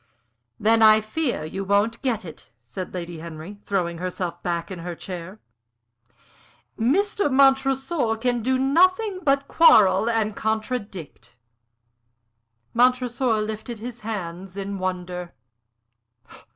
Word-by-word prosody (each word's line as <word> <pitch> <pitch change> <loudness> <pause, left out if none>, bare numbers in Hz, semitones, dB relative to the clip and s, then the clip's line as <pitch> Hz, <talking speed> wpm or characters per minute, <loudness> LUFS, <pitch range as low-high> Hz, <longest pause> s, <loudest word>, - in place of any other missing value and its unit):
"Then 225 +2 +3
I 215 0 +7
fear 220 - -2
you 190 +5 -5
won't 205 +4 +1
get 235 -7 -1
it," 160 - -12
said 120 +11 -7
Lady 175 -2 -6
Henry, 165 +5 -9
throwing 175 -4 -2
herself 180 -1 -4
back 170 0 -3
in 185 - -6
her 175 +1 -6
chair. 185 +3 -8 1.4
"Mr. 375 - +1
Montresor 270 -1 +2
can 245 +1 0
do 260 +3 +1
nothing 370 +9 +2
but 275 -3 +1
quarrel 220 - +5
and 220 -2 0
contradict." 215 - -4 1.4
Montresor 250 -1 +2
lifted 220 +2 -5
his 240 +2 -8
hands 190 -3 -6
in 200 0 -4
wonder. 180 -1 -4
215 Hz, 110 wpm, -24 LUFS, 180-255 Hz, 1.4 s, I